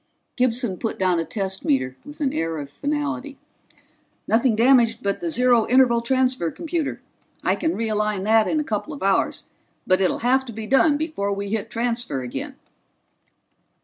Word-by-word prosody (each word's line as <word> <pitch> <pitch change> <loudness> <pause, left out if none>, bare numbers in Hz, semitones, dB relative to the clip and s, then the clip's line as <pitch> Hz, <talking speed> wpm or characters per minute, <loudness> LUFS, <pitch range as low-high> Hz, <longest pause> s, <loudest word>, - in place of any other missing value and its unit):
Gibson 240 -6 0
put 225 - -3
down 185 -2 +2
a 165 - -2
test 195 -1 -4
meter 130 -2 0
with 295 +1 -11
an 270 -2 0
air 165 0 -2
of 140 -2 -7
finality. 285 - -3 0.9
"Nothing 230 +1 +3
damaged 235 -1 +4
but 200 0 -1
the 345 - -3
Zero 250 -6 +3
Interval 245 -2 +4
Transfer 255 -6 +1
computer. 325 - -4 0.4
I - - +2
can 325 0 -1
realign 215 -3 -1
that 220 +1 +4
in 310 - +1
a - - 0
couple 230 +4 -3
of 285 - -7
hours, 195 0 +1 0.4
but 185 +1 +3
it'll 185 - +1
have 260 +2 +3
to 235 - -8
be 220 +1 -6
done 280 +5 +4
before 300 -11 -2
we 200 0 -3
hit 225 +1 -2
Transfer 230 - -2
again." 125 - -5
230 Hz, 170 wpm, -23 LUFS, 200-265 Hz, 0.9 s, damaged